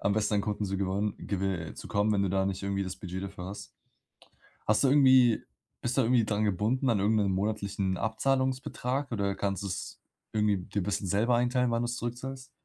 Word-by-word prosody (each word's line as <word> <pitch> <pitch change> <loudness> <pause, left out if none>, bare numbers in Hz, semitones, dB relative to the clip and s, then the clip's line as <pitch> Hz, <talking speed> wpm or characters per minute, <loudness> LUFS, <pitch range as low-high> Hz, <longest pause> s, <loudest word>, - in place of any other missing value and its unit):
am 100 - +1
besten 105 0 +1
an - - +3
Kunden 105 -1 -2
zu 95 - -2
gewon 100 +2 -1
gewi 95 -5 -2
äh, - - -10
zu - - -9
kommen, 105 +1 +2
wenn 100 -1 +2
du 95 - 0
da 95 0 +1
nicht 95 0 -3
irgendwie 100 0 -1
das 95 0 -5
Budget 95 0 -6
dafür 95 -2 -7
hast. 100 +2 -8 0.9
Hast 105 +6 +3
du - - +5
irgendwie 130 -4 +5 0.4
bist 120 +2 -1
du - - +6
irgendwie 120 -1 +3
dran 105 0 0
gebunden 110 +7 +1
an 105 - +2
irgend 105 +3 +3
'nen 100 -2 +1
monatlichen 100 -1 -1
Abzahlungsbetrag 130 +2 -1
oder 100 -2 0
kannst 100 0 -2
du's 95 -2 -5 0.3
irgendwie 105 -2 +2
dir 95 +3 -3
bisschen 100 +1 -2
selber 115 +6 +2
einteilen, 125 0 +2
wann 115 0 +1
du's 120 +1 -2
zurückzahlst? 130 +3 -5
105 Hz, 205 wpm, -29 LUFS, 100-120 Hz, 0.9 s, du